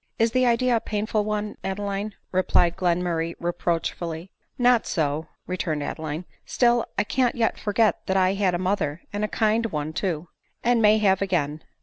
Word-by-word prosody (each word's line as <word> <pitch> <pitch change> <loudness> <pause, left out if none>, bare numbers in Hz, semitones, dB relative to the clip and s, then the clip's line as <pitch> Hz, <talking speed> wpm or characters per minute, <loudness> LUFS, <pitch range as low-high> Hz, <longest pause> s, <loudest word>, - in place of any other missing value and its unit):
" - - -52
Is 225 0 +3
the 255 0 +3
idea 240 +1 +3
a - - +3
painful 215 0 -1
one, 210 0 -2
Adeline 200 +1 -3
?" - - -49
replied 180 -2 +2
Glen 180 -1 +1
murray 165 -1 -1
reproachfully. 170 0 -2
" - - -48
Not 245 -2 +4
so," 155 0 -1 0.2
returned 160 -5 -2
Adeline. 155 +3 -4
" - - -39
Still 240 -1 +2
I 205 - +3
can't 250 +3 +1
yet 230 -2 0
for 205 - -2
get 215 +1 +2
that 190 - +2
I 185 0 +3
had 195 -3 +1
a - - +1
mother, 175 -4 -1
and 205 +1 -2
a - - +2
kind 220 +2 +1
one 155 -4 -3
too." 175 -2 -2 0.2
" - - -44
And 240 -1 +3
may 215 0 +6
have 195 -3 +3
again." 155 -6 0
190 Hz, 205 wpm, -25 LUFS, 170-215 Hz, 0.2 s, may